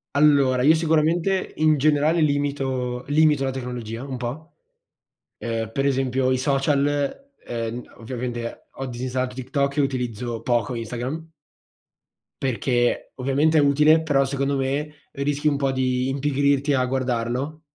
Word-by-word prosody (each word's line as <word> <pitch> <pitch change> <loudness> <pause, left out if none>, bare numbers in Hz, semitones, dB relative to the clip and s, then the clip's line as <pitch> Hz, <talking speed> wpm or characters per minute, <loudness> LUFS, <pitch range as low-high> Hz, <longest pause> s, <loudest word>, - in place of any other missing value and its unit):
Allora, 140 -4 +4
io 155 +3 +7
sicuramente, 165 +4 +1
in 155 -1 +4
generale, 155 +3 +3
limito 135 -4 -1
limito 150 -2 +4
la 135 - 0
tecnologia 125 -2 -5
un 135 -2 -5
po'. 140 +7 -6 0.8
Ehm, 115 -1 -3
per 135 +3 -1
esempio 130 -1 +1
i 130 - +2
social, 145 - 0
ehm, 115 0 -4
ovviamente 120 0 -5
ho 135 - -3
disinstallato 125 +1 -3
TikTok 140 +2 -1
e - - +4
utilizzo 125 -3 -2
poco 120 0 0
Instagram 125 +8 -5 1.1
perché, 120 -1 0
ovviamente 140 +5 +2
è - - +6
utile, 150 +3 +4
però 140 -3 +2
secondo 140 +1 -1
me, 140 +3 -2 0.2
rischi 145 +2 -1
un 145 -2 +2
po' 135 -1 0
di 130 0 0
impigrirti 140 +1 +1
a 130 -1 +2
guardarlo 130 +3 -2
135 Hz, 130 wpm, -23 LUFS, 125-145 Hz, 1.1 s, io